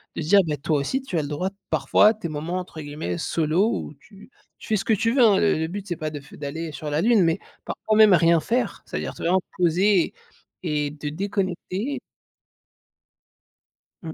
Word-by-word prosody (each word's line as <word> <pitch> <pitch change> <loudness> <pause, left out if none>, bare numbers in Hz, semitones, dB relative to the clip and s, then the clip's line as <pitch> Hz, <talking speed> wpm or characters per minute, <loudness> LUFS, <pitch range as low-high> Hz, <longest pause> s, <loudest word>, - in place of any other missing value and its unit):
De - - -3
dire: 200 +6 +5
«Bah 150 -2 -1
toi 145 +1 0
aussi 260 - -1
tu 190 -10 -4
as - - +2
le 145 - -5
droit 150 +6 -2 0.2
parfois - - +4
à 215 - +5
tes 215 -6 -6
moments 160 +4 -3
entre 170 -3 -8
guillemets 145 +3 -4
«solo» 165 +5 +1
où 155 - -5
tu 200 - -17 0.3
tu - - -13
fais 220 - +1
ce 195 - -1
que 225 - +3
tu 225 +3 +1
veux» 265 - +3
hein, 205 -4 +5
le 205 - +3
le 160 0 -1
but 200 +3 -6
c'est 175 - -2
pas 155 0 -4
de 150 - -6
f 140 +1 -17
d'aller 155 +3 -5
sur 150 +2 -5
la 150 +2 0
lune 225 -4 +4
mais 165 +3 +1 0.2
parfois 215 - -2
même 215 -2 +7
rien 170 -1 +5
faire, 240 +10 -1
c'est-à-dire - - -4
te, - - -12
vraiment, 185 +3 +3 0.2
poser 180 +2 +3 0.5
et 150 -4 0
et 145 - -8
te 150 - -5
déconnecter. 195 - -3 2.0
Mmh. 160 -2 -7
175 Hz, 210 wpm, -24 LUFS, 155-205 Hz, 2.0 s, même